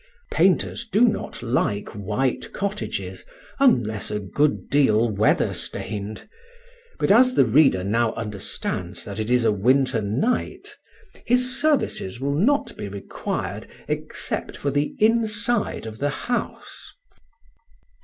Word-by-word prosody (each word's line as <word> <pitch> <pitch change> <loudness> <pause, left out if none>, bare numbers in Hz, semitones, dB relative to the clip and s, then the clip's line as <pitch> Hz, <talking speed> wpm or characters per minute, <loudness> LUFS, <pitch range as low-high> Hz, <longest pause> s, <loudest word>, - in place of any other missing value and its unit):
Painters 235 - +2
do 215 0 +1
not 225 - +1
like 115 -4 0
white 105 +6 -2
cottages, 200 +1 -4 0.4
unless 110 - +2
a 105 - -2
good 145 +9 0
deal 120 -5 +3
weather 105 -1 +2
stained; 105 +1 -5 0.7
but - - +1
as 255 +4 +5
the - - +5
reader 125 -6 +4
now 115 +3 +1
understands 105 -3 -4
that - - -6
it 110 +1 -2
is 125 -1 +3
a 110 - +4
winter 125 +4 +2
night, 120 - -2 0.5
his 250 +1 +2
services 275 - 0
will 140 +2 -1
not 245 - +1
be - - -5
required 100 0 -5 0.2
except - - -4
for 140 - -2
the 145 - -1
inside 225 - +1
of 110 0 -8
the 145 - +1
house. 245 - -4
130 Hz, 125 wpm, -23 LUFS, -, 0.7 s, as